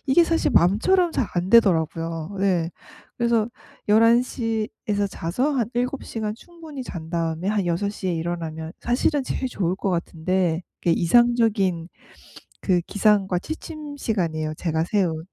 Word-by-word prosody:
이게 335 +6 +5
사실 330 0 +1
마음처럼 330 - +3
잘 225 - 0
안 175 +1 -1
되더라고요. 165 -4 +2
예. 180 -4 +1 0.5
그래서 235 -2 +1 0.4
11:00 225 0 +3 0.2
에서 205 -1 +1
자서 195 - -1
한 240 -6 0
7 250 +3 -1
시간 215 -2 -4
충분히 320 0 -10
잔 165 -9 -8
다음에 165 0 -2
한 205 -3 0
6:00 190 +3 -2
에 - - +1
일어나면 160 -1 -4
사실은 270 +4 +1
제일 260 - -3
좋을 185 -6 -1
것 195 - -1
같은데 175 0 -1 0.2
그게 170 - +2
이상적인 205 -3 +3 0.8
그 185 -2 +3
기상과 195 -1 +2
취침 310 - -7
시간이에요 165 - -1
제가 160 -1 -1
세운. 170 -5 0
200 Hz, 280 characters per minute, -23 LUFS, 170-235 Hz, 0.8 s, 이게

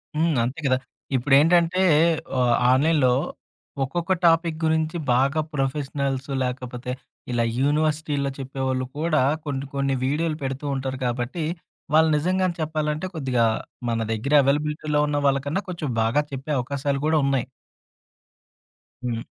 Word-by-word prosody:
హ్మ్. 160 -1 +2
అంతే 130 +7 -3
కద. 130 -1 +4 0.4
ఇప్పుడేంటంటే 165 +8 +4 0.6
ఆహ్, 125 -1 +3 0.2
ఆన్లైన్‌లో 140 -1 +3 0.7
ఒక్కొక్క 170 +6 -3
టాపిక్ 165 -1 +3
గురించి 160 +1 +1 0.2
బాగా 140 +5 +2
ప్రొఫెషనల్స్ 135 -1 -2
లాకపోతే 125 0 -4 0.4
ఇలా 120 -1 +1 0.2
యూనివర్సిటీలో 150 0 +1
చెప్పేవాళ్ళు 130 -1 -2
కూడా 155 -3 +2 0.2
కొన్ని 140 -1 -3
కొన్ని 140 -1 +1
వీడియోలు 155 +3 0
పెడుతూ 135 +2 -4
ఉంటారు 130 -1 -3
కాబట్టి, 125 +7 -2 0.5
వాళ్ళు 160 0 +5
నిజంగానే 185 +2 0
చెప్పాలంటే 155 +1 -1
కొద్దిగా 130 -6 +1 0.4
మన 115 -1 0
దెగ్గర 115 +7 -1
అవైలబిలిటీలో 150 +1 0
ఉన్న 145 0 0
వాళ్ళకన్నా 140 +7 0
కొంచెం 170 -5 -4
బాగా 115 +6 +2
చెప్పే 135 +3 -5
అవకాశాలు 140 +2 -2
కూడా 160 0 +3
ఉన్నాయి. 135 -3 +1 1.6
హ్మ్. 115 -2 -3
140 Hz, 120 wpm, -24 LUFS, 130-155 Hz, 1.6 s, వాళ్ళు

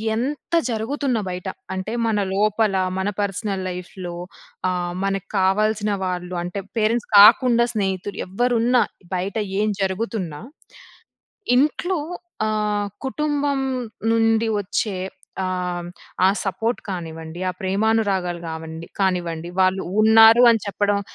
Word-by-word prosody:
ఎంత 285 +7 -4 0.2
జరుగుతున్న 245 +3 -1
బయట, 180 +1 -5 0.3
అంటే 190 +3 -4 0.2
మన 215 -2 +1 0.2
లోపల 210 0 +2 0.2
మన 190 +2 0
పర్సనల్ 195 -1 -2
లైఫ్‌లో 180 -1 -7 0.5
ఆహ్, 175 -1 -2
మనకు 195 0 -2
కావాల్సిన 210 +2 +2
వాళ్ళు 180 0 -3
అంటే 180 +3 -4 0.2
పేరెంట్స్ 225 +2 +1
కాకుండా 235 +3 +7
స్నేహితులు. 195 -1 -2
ఎవరున్నా, 240 +4 +2 0.3
బయట 190 +4 -2 0.2
ఏం 215 - +2
జరుగుతున్నా 190 -5 -2 1.2
ఇంట్లో 315 +6 +1 0.5
ఆహ్, 210 -1 0 0.2
కుటుంబం 290 -1 0 0.5
నుండి 225 0 +3
వచ్చే 200 0 -2 0.5
ఆహ్, 185 - -1 0.3
హ్మ్, 175 - -7 0.4
ఆ - - +6 0.2
సపోర్ట్ 225 +4 -1
కానివ్వండి 165 -1 -6
ఆ - - -6
ప్రేమానురాగాలు 195 -3 0
కావండి 160 +1 -7
కానివ్వండి 175 -3 -1
వాళ్ళు 185 +1 +1 0.2
ఉన్నారు 225 +2 +8
అని 225 - -1
చెప్పడం, 205 0 +1
205 Hz, 110 wpm, -22 LUFS, 185-225 Hz, 1.2 s, ఉన్నారు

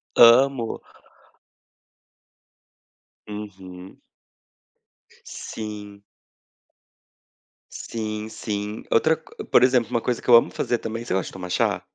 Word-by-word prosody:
Amo. 120 0 +5 2.5
Uhum. 95 -3 -10 1.2
Sim. 105 -2 -8 1.7
Sim, 110 -1 -5
sim. 105 -1 -5
Outra 160 +7 +4
co 160 - -12
por 125 - +4
exemplo, 125 -3 +3
uma 115 - 0
coisa 125 -2 -2
que - - -15
eu 120 - +9
amo 115 - +5
fazer 120 - -1
também 115 +1 -5
você - - -2
gosta 95 - -1
de - - -16
tomar 90 -1 -7
chá? - - 0
110 Hz, 105 wpm, -23 LUFS, 105-120 Hz, 2.5 s, eu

